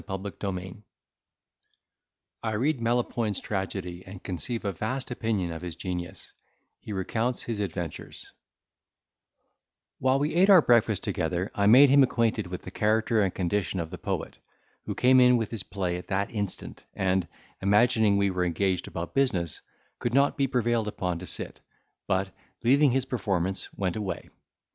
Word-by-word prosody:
CHAPTER 95 +1 -4 0.2
LXII 95 +1 -6 1.6
I 110 -1 -2
read 130 +4 0
Melopoyn's 115 -3 0
Tragedy, 95 -3 -4
and 95 0 -11
conceive 105 +6 -4
a 100 - +1
vast 125 +9 -3
Opinion 110 -7 -1
of 80 - -6
his 90 -3 -6
Genius—he 90 +3 -8
recounts 110 +5 -1
his 115 -3 -4
Adventures 85 -5 -5 1.7
While 130 +1 +3
we 145 +3 0
ate 185 +4 +4
our 185 -5 +8
breakfast 115 -4 +3
together, 90 +1 -2
I 100 0 +2
made 130 +6 +8
him 140 0 +7
acquainted 115 -5 +1
with 90 0 -6
the 90 - -8
character 110 +2 +2
and 95 -2 +1
condition 95 0 -1
of 80 -1 -4
the 90 - -7
poet, - - -4 0.5
who - - -4
came 130 +1 +5
in 125 -1 +6
with 115 -2 -2
his 115 -4 -3
play 90 -2 -3
at 90 - -9
that 100 +1 -1
instant, 100 -4 -4
and, 95 -2 +1 0.3
imagining 105 +1 +4
we 100 -1 +2
were 90 -1 0
engaged 90 +1 0
about 85 +1 -5
business, 95 - 0 0.4
could 120 +1 -1
not 140 +1 +4
be 140 -1 +1
prevailed 120 -3 0
upon 90 -4 -2
to 90 - -8
sit; - - -5 0.5
but, 95 0 0 0.3
leaving 140 +4 +5
his 130 +1 +1
performance, 95 -7 -2
went 95 -3 -1
away. 105 -3 -4
100 Hz, 155 wpm, -27 LUFS, 90-120 Hz, 1.7 s, our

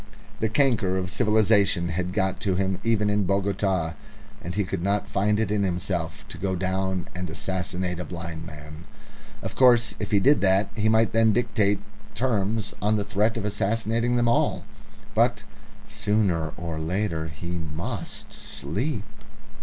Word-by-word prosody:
The 110 - +1
canker 115 -6 +2
of 90 -1 -2
civilisation 100 -5 +3
had 90 +2 -2
got 95 -1 0
to 95 -3 0
him 95 0 0
even 110 -2 +2
in 105 -1 +1
Bogota, 95 -3 0 0.5
and 90 +1 -5
he 105 - +2
could 95 -1 -3
not 100 +2 0
find 105 +2 +1
it 110 -2 0
in 105 -1 +1
himself 90 -3 -2
to - - -8
go 95 -1 -1
down 95 0 -1
and 90 -1 -4
assassinate 90 +1 -2
a - - -2
blind 85 -2 -6
man. 75 0 -10 0.6
Of - - -4
course, 120 -3 +5
if 105 - -3
he 100 - +4
did 140 +8 +4
that, 95 +1 +3
he 110 0 +2
might 110 0 +3
then 115 -1 +4
dictate 105 -4 +1 0.3
terms 110 -3 0
on 105 +1 +2
the 105 -1 -1
threat 105 +3 +1
of 105 - -3
assassinating 115 +3 0
them 120 -1 +2
all. 120 - +1 0.5
But - - +2 0.4
sooner 105 -7 +1
or 85 -2 -4
later 80 -1 -1
he 80 +2 -7
must 85 +6 -5
sleep!... 100 - -3
100 Hz, 160 wpm, -25 LUFS, 90-110 Hz, 0.6 s, course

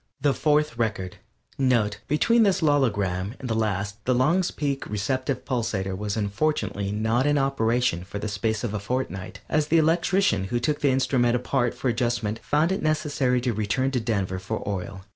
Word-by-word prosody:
THE 145 0 +2
FOURTH 150 -6 +1
RECORD 105 -5 -2 0.4
(NOTE: 115 -6 +2
_Between 230 +10 +4
this 195 -4 +2
logogram 105 - +1
and 130 - -6
the 115 - 0
last 105 -1 -2
the 130 - +2
Long's 170 +9 +2
Peak 140 -2 -3
Receptive 130 +5 -2
Pulsator 105 -7 -1
was 105 +2 -3
unfortunately 100 -2 -1
not 110 +5 +1
in 145 0 +3
operation 120 -8 +1
for 100 +2 -7
the 105 - -3
space 105 +1 -1
of 115 -4 -2
a 105 - -1
fortnight, 100 -4 -4
as 150 -1 +1
the 165 - +3
electrician 165 - +2
who 120 +5 -1
took 145 +5 -1
the 145 - +3
instrument 125 -2 +2
apart 125 0 0
for - - -3
adjustment 120 -2 0
found 155 +4 +1
it 190 - -1
necessary 145 -5 +1
to 120 -1 0
return 110 +6 0
to 130 - 0
Denver 100 -5 -1
for 100 +4 -5
oil. 95 -1 -4
120 Hz, 180 wpm, -25 LUFS, 105-140 Hz, 0.4 s, Between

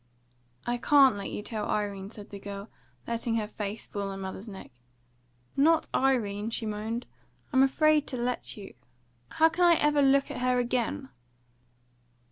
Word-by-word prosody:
"I 240 0 0
can't 275 -3 +6
let 200 -1 -5
you 210 - -5
tell 215 -1 -4
Irene," 200 -2 -2
said 210 -2 -11
the 200 - -7
girl, 200 +1 -7 0.4
letting 230 0 -1
fall 225 - +1
her 210 - -4
face 210 0 -5
on 200 -1 -2
her 195 - -5
mother's 190 +2 -6
neck. 195 -3 -9 0.8
"Not 320 +3 +3
Irene," 225 -6 +1
she 230 0 -3
moaned. 220 +3 -3 0.5
"I'm 260 - +5
afraid 300 +2 +4
to 255 - -3
let 245 -1 -2
you. 200 -2 -9 0.6
How 320 - +4
can 340 +2 0
I 345 -1 +7
ever 295 -2 +3
look 275 0 +4
at - - -5
her 250 0 +2
again?" 240 - -1
230 Hz, 165 wpm, -28 LUFS, 205-270 Hz, 0.8 s, I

